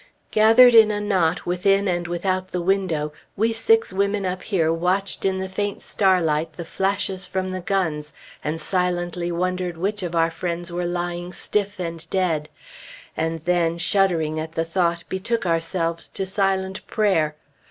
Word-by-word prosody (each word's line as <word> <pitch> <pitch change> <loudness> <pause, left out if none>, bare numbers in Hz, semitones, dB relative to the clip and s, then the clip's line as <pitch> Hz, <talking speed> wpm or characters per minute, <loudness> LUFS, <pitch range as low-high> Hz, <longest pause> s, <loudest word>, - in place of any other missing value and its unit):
Gathered 225 +3 +7
in 220 -2 +8
a 210 -1 -1
knot 185 -5 +1
within 195 +3 +2
and 175 -1 -1
without 185 +2 -1
the 180 - -3
window, 170 -5 0 0.2
we 225 +3 +2
six 450 - +2
women 200 +1 0
up 185 0 -2
here 165 -6 +1
watched 185 +5 -1
in 190 -1 +1
the 190 0 -3
faint 200 +2 -3
starlight 165 -5 +1
the 170 +2 -7
flashes 190 -1 -1
from 185 0 -2
the 185 0 -4
guns, 160 -6 -1 0.3
and 155 +2 -2
silently 175 0 -1
wondered 180 0 -2
which 200 +4 -2
of 175 -2 -4
our 165 0 +3
friends 175 0 -4
were 175 0 -2
lying 175 0 -3
stiff 205 +1 -2
and 165 -2 -5
dead, 165 -5 0 0.7
and 160 0 -2
then, 170 -2 +1
shuddering 170 -4 +1
at 160 +1 -5
the 165 - -1
thought, 170 0 0
betook 195 +4 -2
ourselves 165 0 -1
to 195 - -4
silent 190 0 -1
prayer. 165 -8 +1
180 Hz, 160 wpm, -23 LUFS, 165-195 Hz, 0.7 s, in